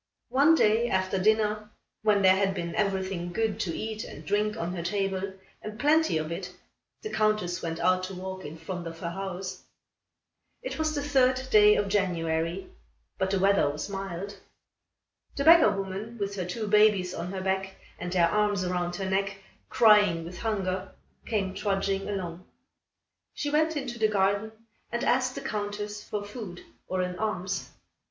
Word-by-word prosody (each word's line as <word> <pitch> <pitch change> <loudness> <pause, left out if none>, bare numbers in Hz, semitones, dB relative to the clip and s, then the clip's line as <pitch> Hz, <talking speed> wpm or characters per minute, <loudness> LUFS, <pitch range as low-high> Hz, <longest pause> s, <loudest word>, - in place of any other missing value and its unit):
One 290 +5 +5
day, 230 -3 +3
after 190 0 0
dinner, 215 +1 +2 0.3
when 210 -2 +3
there 190 0 +7
had 195 0 +1
been 170 -2 -3
everything 190 -3 -1
good 220 +2 -1
to 175 -7 -2
eat 220 0 -4
and 150 - -10
drink 210 +5 0
on 175 -4 -3
her 175 - -3
table, 195 +1 -2 0.3
and 215 +1 -7
plenty 310 - +3
of 155 +1 -3
it, 180 +1 -5 0.5
the 430 - -4
Countess 215 -5 +1
went 165 -1 -3
out 185 0 +3
to 190 0 -7
walk 190 +1 -6
in 150 +2 -8
front 175 +1 -6
of 165 0 -7
her 170 0 -4
house. 190 0 -5 1.0
It - - -5
was 310 0 0
the 285 - -1
third 260 -2 +2
day 210 0 +7
of 205 - +1
January, 170 -3 0 0.5
but 190 - +1
the 195 - +1
weather 195 -5 +3
was 150 +6 -4
mild. 195 0 -5 1.0
The 280 - -1
beggar 325 -5 +8
woman, 200 +3 -4
with 200 -1 -2
her 185 -3 -3
two 200 +5 -4
babies 205 -3 +4
on 175 +2 -4
her 190 -1 -4
back 190 0 -1 0.2
and 175 0 -4
their 175 -2 +4
arms 205 0 +1
round 175 -1 -1
her 190 +1 -3
neck, 195 +1 0 0.3
crying 205 -7 +5
with 175 +1 -8
hunger, 190 -4 -2 0.3
came 195 -4 -1
trudging 195 -1 -1
along. 180 -3 -5 0.9
She 290 - -2
went 315 +1 +2
into 250 -4 -4
the 220 - +4
garden 200 +1 +1 0.4
and 235 0 -2
asked 255 0 +2
the - - -5
Countess 210 0 -4
for 205 -1 -4
food 205 -4 -8 0.3
or 185 0 -1
an 180 0 -4
alms. 195 -3 -2
195 Hz, 170 wpm, -28 LUFS, 185-215 Hz, 1.0 s, beggar